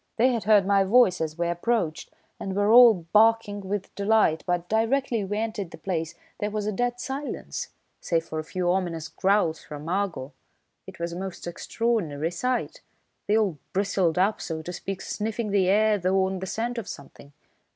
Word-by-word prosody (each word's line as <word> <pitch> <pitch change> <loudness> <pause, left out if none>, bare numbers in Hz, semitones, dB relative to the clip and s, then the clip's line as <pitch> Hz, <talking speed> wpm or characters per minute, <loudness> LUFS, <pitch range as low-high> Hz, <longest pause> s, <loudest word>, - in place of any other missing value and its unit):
"They 245 +3 +4
had 230 - -2
heard 210 -3 +5
my 200 0 +4
voice 195 -3 +4
as 160 0 -3
we 170 0 0
approached 175 -1 -1 0.3
and 190 -1 -4
were 205 +1 +2
all 230 -8 +7
barking 215 -1 +4
with 195 0 -4
delight, 200 -5 +2
but 175 -1 -1
directly 230 +1 +1
we 205 +2 -3
entered 215 -4 -3
the - - -11
place 165 -4 -3 0.2
there 210 - -1
was 210 -1 -3
a 215 - 0
dead 245 +3 -1
silence, 275 +3 -5 0.3
save 165 -1 -1
for 155 - -4
a - - -3
few 175 +2 -1
ominous 170 -4 -2
growls 190 -3 +1
from 150 +1 -9
Argo. 175 -7 -2 0.5
It - - -10
was 170 0 -3
a 175 - -5
most 190 -2 -6
extraordinary 175 -4 -1
sight. 250 +8 -2 0.5
They 210 - +3
all 195 -9 0
bristled 190 -4 +1
up, 195 +4 +2
so 160 -1 -4
to 180 - -6
speak, 195 +2 -5
sniffing 220 0 -3
the 195 -2 +3
air 210 +1 +3
though 190 +1 +2
on 190 0 -3
the 190 - -5
scent 235 +4 -2
of 215 - -8
something. 140 0 -11
195 Hz, 185 wpm, -26 LUFS, 175-220 Hz, 0.5 s, all